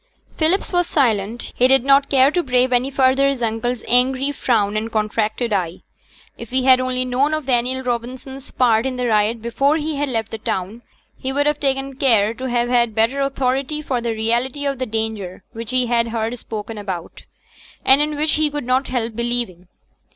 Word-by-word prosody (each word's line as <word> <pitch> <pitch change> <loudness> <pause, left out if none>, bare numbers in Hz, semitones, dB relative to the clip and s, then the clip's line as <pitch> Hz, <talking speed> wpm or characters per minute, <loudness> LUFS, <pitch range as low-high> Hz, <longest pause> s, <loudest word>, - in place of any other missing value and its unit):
Philip 340 +5 0
was 355 -1 +2
silent. 230 -5 0
He 250 - +4
did 265 -1 +4
not 275 +1 +4
care 270 0 +4
to 355 - +1
brave 255 -3 +2
any 250 +2 +2
further 270 0 +3
his 265 -3 -3
uncle's 230 +2 -2
angry 260 +3 +2
frown 215 -7 0
and 220 +2 -2
contracted 220 +1 -1
eye. 180 -3 -2 0.6
If 235 - -8
he 260 0 0
had 260 -1 +6
only 255 0 -1
known 270 +5 +1
of 310 -3 -5
Daniel 255 +1 0
Robson's 255 +2 -5
part 235 -1 +2
in 260 - -3
the 250 0 -2
riot 220 0 +1
before 275 +6 +1
he 310 -1 -3
had 290 0 -1
left 225 -3 -3
the 225 - -5
town, 205 +2 -4 0.4
he 260 - -3
would 285 +2 +1
have 295 0 +1
taken 270 -1 -2
care 225 -6 +3
to 260 +2 -5
have 240 0 +1
had 240 -3 +1
better 230 +5 +2
authority 275 +2 -1
for 255 -4 -2
the 230 -1 -2
reality 240 +6 -1
of 275 -2 -1
the 255 - -2
danger 215 -4 -4
which 230 0 -7
he 255 0 +2
had 235 -1 +1
heard 225 +1 -2
spoken 215 0 -6
about, 185 -4 -7 0.6
and 270 +2 +6
in 300 0 -1
which 300 +1 +1
he 305 -1 +1
could 290 -3 -5
not 255 +2 +1
help 235 -3 -3
believing. 235 -7 -3
250 Hz, 195 wpm, -20 LUFS, 225-270 Hz, 0.6 s, had